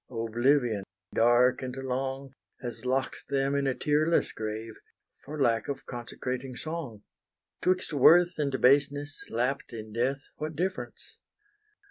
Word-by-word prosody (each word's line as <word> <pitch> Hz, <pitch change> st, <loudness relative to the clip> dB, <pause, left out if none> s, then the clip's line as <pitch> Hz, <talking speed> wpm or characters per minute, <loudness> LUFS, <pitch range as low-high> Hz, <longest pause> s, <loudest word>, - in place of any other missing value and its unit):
oblivion, 120 Hz, -1 st, +1 dB, 0.3 s
dark 120 Hz, +2 st, +4 dB
and 125 Hz, -1 st, -4 dB
long, 135 Hz, +1 st, -3 dB, 0.3 s
Has 120 Hz, -2 st, -6 dB
lock'd 130 Hz, +1 st, -1 dB
them 135 Hz, 0 st, +1 dB
in 140 Hz, -1 st, +1 dB
a 130 Hz, -, +1 dB
tearless 155 Hz, +2 st, +2 dB
grave, 110 Hz, +1 st, -5 dB, 0.5 s
For 150 Hz, +2 st, -7 dB
lack 115 Hz, -5 st, +2 dB
of 140 Hz, -1 st, -4 dB
consecrating 125 Hz, +1 st, -5 dB
song. 140 Hz, -8 st, -5 dB, 0.6 s
'Twixt 185 Hz, -2 st, +1 dB
worth 175 Hz, +5 st, +6 dB
and 140 Hz, -3 st, 0 dB
baseness, 145 Hz, +2 st, +2 dB
lapp'd 125 Hz, +3 st, -1 dB
in 110 Hz, -1 st, -7 dB
death, 135 Hz, +4 st, 0 dB
What 155 Hz, +1 st, -4 dB
difference? 185 Hz, +4 st, -4 dB
135 Hz, 125 wpm, -29 LUFS, 120-145 Hz, 0.6 s, worth